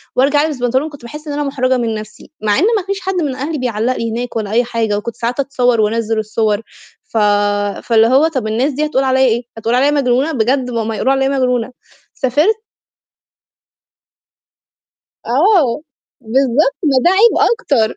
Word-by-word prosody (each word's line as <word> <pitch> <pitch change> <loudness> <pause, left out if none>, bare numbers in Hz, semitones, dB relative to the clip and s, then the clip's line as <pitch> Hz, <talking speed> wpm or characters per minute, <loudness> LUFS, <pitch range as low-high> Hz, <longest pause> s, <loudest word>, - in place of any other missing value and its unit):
وارجع 290 +3 +3
ألبس 300 -4 -3
بنطلون 260 +5 0
كنت 290 -4 -13
باحِسّ 300 +6 -9
إن 290 - -3
أنا 295 0 -1
مُحرجة 260 -2 0
من 230 -2 -1
نفسي، 215 +4 -10
مع 210 +3 +1
إن - - +2
ما 385 - -3
فيش 395 0 -2
حد 380 0 -3
من 295 -7 -1
أهلي 300 +4 -3
بيعلّق 245 0 -1
لي 230 -1 -3
هناك 240 +1 -4
ولا 215 -2 -3
أي 240 +2 +3
حاجة، 225 -3 -1
وكنت 225 +2 -5
ساعات 240 +3 -3
أتصوّر 250 -4 +1
وأنزِّل 225 +1 0
الصور، 215 0 -1 0.4
ف 225 - -6 0.7
فاللي 225 -1 +4
هو 275 +6 +4
طَب 260 -9 -3
الناس 250 +6 0
دي 300 +3 -1
هتقول 270 -3 0
عليَّ 260 0 +1
إيه؟ 235 0 +1 0.2
هتقول 230 +2 -1
عليَّ 280 +3 +3
مجنونة؟ 275 +1 +1
بجد 255 0 0
ما 230 -1 -1
هم 225 - -3
هيقولوا 260 +4 0
عليَّ 270 0 +1
مجنونة، 250 -3 0 0.4
سافرت 300 - +1 2.7
آه، 295 - +2 0.4
بالضبط، 265 - +1
ما 275 -4 +2
ده - - +6
عيب 425 +5 +4
أكتر، 275 - 0
255 Hz, 175 wpm, -16 LUFS, 230-290 Hz, 2.7 s, ده